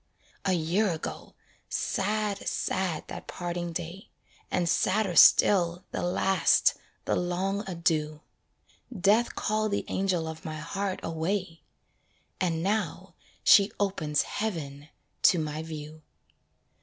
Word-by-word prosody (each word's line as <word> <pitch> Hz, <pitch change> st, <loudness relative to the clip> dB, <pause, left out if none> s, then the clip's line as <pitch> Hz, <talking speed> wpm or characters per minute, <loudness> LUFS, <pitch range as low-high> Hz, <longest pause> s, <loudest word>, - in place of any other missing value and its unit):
A 190 Hz, -, +2 dB
year 180 Hz, +5 st, +1 dB
ago! 160 Hz, -, -7 dB, 0.3 s
sad, 210 Hz, 0 st, -1 dB
sad 185 Hz, -4 st, -2 dB
that -, -, -8 dB
parting 175 Hz, -1 st, -4 dB
day, 170 Hz, +3 st, -6 dB, 0.4 s
And 175 Hz, -2 st, 0 dB
sadder 190 Hz, +2 st, +1 dB
still, 175 Hz, +1 st, +6 dB
the -, -, -3 dB
last, 180 Hz, 0 st, +3 dB, 0.3 s
the -, -, +1 dB
long 190 Hz, +3 st, -1 dB
adieu. 155 Hz, -3 st, -1 dB, 0.8 s
Death 210 Hz, +5 st, +3 dB
called 215 Hz, 0 st, 0 dB
the -, -, -1 dB
angel 185 Hz, -4 st, 0 dB
of 160 Hz, +2 st, -7 dB
my 155 Hz, -3 st, -5 dB
heart 195 Hz, +4 st, -3 dB
away 165 Hz, +1 st, -2 dB, 0.8 s
And 165 Hz, -3 st, 0 dB
now 210 Hz, +3 st, -2 dB, 0.3 s
she 200 Hz, 0 st, +6 dB
opens 155 Hz, -7 st, 0 dB
heaven 155 Hz, -9 st, -4 dB, 0.3 s
to 180 Hz, -, +5 dB
my 155 Hz, -1 st, -3 dB
view. 155 Hz, -1 st, -8 dB
175 Hz, 115 wpm, -28 LUFS, 160-195 Hz, 0.8 s, still